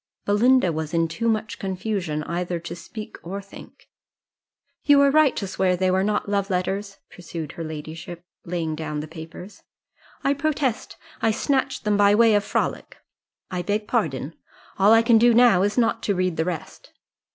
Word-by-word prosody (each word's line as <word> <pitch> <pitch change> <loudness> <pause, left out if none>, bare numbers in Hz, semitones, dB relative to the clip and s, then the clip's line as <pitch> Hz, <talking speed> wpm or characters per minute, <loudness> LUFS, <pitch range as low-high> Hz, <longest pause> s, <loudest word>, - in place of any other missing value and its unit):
Belinda 205 -2 +3
was 160 +1 -4
in 165 0 +2
too 195 +9 -3
much 220 -1 -2
confusion 185 -5 -3
either 175 +1 -3
to 170 - -7
speak 215 +5 -9
or 190 +4 -5
think. 200 0 -14 1.0
"You 290 -1 +5
were 280 0 +5
right 305 -2 +4
to 200 - -3
swear 185 -1 0
they 185 0 +1
were 190 +1 +2
not 210 +1 -1
love 200 0 -1
letters," 195 +2 -2
pursued 165 -4 -7
her 165 - -7
ladyship, 160 +2 -8 0.2
laying 170 -2 -3
down 150 -1 -4
the 155 - -7
papers. 160 +5 -11 0.6
"I 275 - +3
protest 280 -4 -2 0.2
I 225 - +3
snatched 265 +4 0
them 210 -1 +1
by 205 0 +5
way 225 0 +5
of 205 -1 +3
frolic - - -2 0.5
I 180 -1 -2
beg 210 +3 -2
pardon. 160 - -1 0.5
All 200 +2 +6
I 225 0 +6
can 230 -1 +5
do 240 0 +5
now 235 -6 +6
is 205 +3 0
not 230 -2 +2
to 200 - 0
read 185 -2 0
the 160 - -1
rest." 175 -4 -6
195 Hz, 175 wpm, -23 LUFS, 170-225 Hz, 1.0 s, All